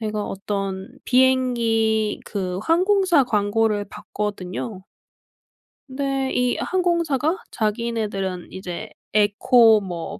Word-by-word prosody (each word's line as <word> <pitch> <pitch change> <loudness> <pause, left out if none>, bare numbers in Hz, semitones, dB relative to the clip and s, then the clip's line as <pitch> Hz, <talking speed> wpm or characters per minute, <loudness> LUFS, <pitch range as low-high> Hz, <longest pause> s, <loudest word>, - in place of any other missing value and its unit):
제가 215 -1 -2
어떤 195 -1 -4 0.2
비행기 235 -4 +2
그 185 -3 -3
항공사 365 - +3
광고를 210 -1 +1
봤거든요. 200 0 -5 1.1
근데 270 0 -2
이 250 0 +1
항공사가 340 -3 0
자기네들은 210 -4 -2
이제 180 -2 -6 0.2
에코 215 +1 +5
뭐 175 -3 -6
220 Hz, 205 characters per minute, -22 LUFS, 205-260 Hz, 1.1 s, 에코